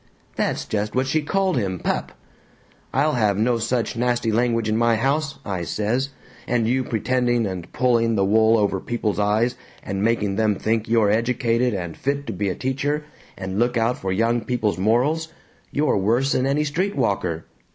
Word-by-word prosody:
That's - - -1
just 105 +1 -2
what 130 +1 +2
she 155 +4 +1
called 190 +1 0
him 95 -5 -1
pup. - - -2 0.8
'I'll 150 +3 +2
have 105 -5 +2
no 115 +2 +2
such 115 -1 -1
nasty 120 -1 0
language 115 0 +1
in 110 - +1
my 115 0 +3
house,' 140 +5 0
I 95 -4 -3
says, 110 - -1 0.4
'and 120 -2 +1
you 130 +2 +1
pretending 120 0 0
and 95 -3 -5
pulling 115 -3 +2
the 100 -2 +2
wool 110 +3 +4
over 100 -2 +1
people's 110 -1 -2
eyes 110 +4 +2 0.3
and 95 0 -3
making 105 -3 +1
them 110 -2 +2
think 110 +2 -1
you're 115 -3 +3
educated 120 +1 +1
and 85 -3 -4
fit 140 +1 -2
to - - -4
be 100 +1 -1
a 90 - -2
teacher 140 +3 -1 0.3
and 95 +2 -4
look 120 +1 +2
out 115 +2 +2
for 95 - -4
young 115 +4 +1
people's 115 -6 -1
morals 130 +11 +2 0.4
you're 145 -6 +1
worse 120 +8 +2
'n 130 +1 +1
any 145 +2 +1
street 175 +7 -1
walker!' 90 - -1
115 Hz, 180 wpm, -23 LUFS, 105-130 Hz, 0.8 s, wool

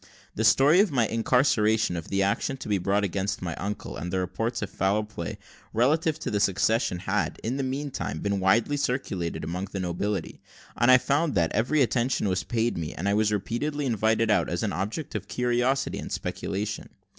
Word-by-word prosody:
The 110 - -2
story 135 +9 +6
of 205 0 +4
my 125 -6 +2
incarceration, 110 -4 +2
of 85 -2 -5
the 100 0 +1
action 100 +7 0
to - - -8
be 100 -2 +1
brought 100 +3 +1
against 100 +1 -1
my 85 -2 -2
uncle, 100 -10 -5
and 85 +6 -5
the 95 - 0
reports 95 +6 -2
of 100 - -5
foul 100 +3 +1
play, 105 -6 -6 0.4
relative 155 +7 +2
to - - -3
the 105 - +1
succession, 105 0 +2
had, 95 +3 -2
in 120 +4 -1
the - - -1
meantime, 135 - -3
been 100 +2 -1
widely 115 +9 +2
circulated 115 -11 -2
among 90 +4 -3
the 100 0 -6
nobility; 95 +1 -3 0.3
and 120 - +3
I 130 - +9
found 145 +3 0
that, 85 -3 +2
every 135 +6 +2
attention 120 -2 0
was 95 -1 0
paid 115 -4 -1
me, 80 -2 -5
and 95 - -3
I 100 - +2
was 105 0 +2
repeatedly 140 +8 -2
invited 115 -1 +2
out 105 - +2
as - - -2
an - - -1
object 105 - -4
of - - -4
curiosity 125 +2 0
and - - -7
speculation. 105 +2 -3
110 Hz, 195 wpm, -26 LUFS, 95-125 Hz, 0.4 s, I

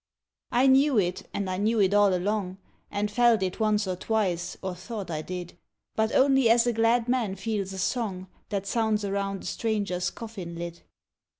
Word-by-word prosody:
I 245 +2 +3
knew 270 0 +5
it, 180 -3 0
and 200 -1 -3
I 185 0 -2
knew 220 +3 +1
it 195 -1 +3
all 205 -1 +5
along, 190 0 -1 0.2
— - - -37
And 205 0 -1
felt 235 -2 +4
it 185 +3 -3
once 215 -1 +2
or 185 -1 -2
twice, 180 -4 -1
or 190 -1 -2
thought 185 0 -6
I 155 -1 -2
did; 175 +1 -7 0.4
But 220 0 +1
only 270 -3 +5
as 235 +1 +5
a 240 - +1
glad 230 +1 +2
man 240 -6 0
feels 200 -1 -3
a 190 - -7
song 190 -2 -2 0.2
That 200 -2 -2
sounds 215 0 0
around 195 0 -2
a - - -10
stranger's 205 -5 -1
coffin 195 -7 -8
lid. 170 0 -6
205 Hz, 190 wpm, -27 LUFS, 185-225 Hz, 0.4 s, knew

